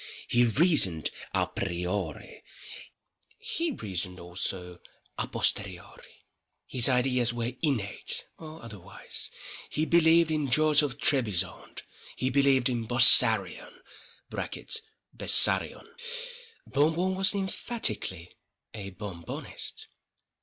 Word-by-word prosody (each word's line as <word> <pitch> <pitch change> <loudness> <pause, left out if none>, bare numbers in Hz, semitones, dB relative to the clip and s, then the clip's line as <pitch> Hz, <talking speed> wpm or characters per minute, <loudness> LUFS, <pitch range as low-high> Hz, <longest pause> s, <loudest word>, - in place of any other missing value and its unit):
He 120 0 +3
reasoned 120 - +2 0.2
à - - +2
priori—He 95 - -6
reasoned 95 - -4
also 90 0 -5 0.4
à - - -1
posteriori. 95 -3 -3 0.4
His 125 0 +2
ideas 125 -2 +2
were 120 0 -2
innate—or 150 +4 -4
otherwise. 105 -6 -5 0.4
He 155 - -1
believed 165 0 +4
in 150 -3 -1
George 155 +3 +4
of 145 -4 -3
Trebizonde—He 115 - -2
believed 135 -2 +3
in 120 -3 -3
Bossarion 120 +1 +4 1.4
[Bessarion]. - - +4 0.8
Bon 150 +3 +1
Bon 185 +2 -1
was 190 +1 +3
emphatically 185 - -2 0.4
a—Bon 100 -3 -8
Bonist. 85 - -6
120 Hz, 85 wpm, -27 LUFS, 95-155 Hz, 1.4 s, believed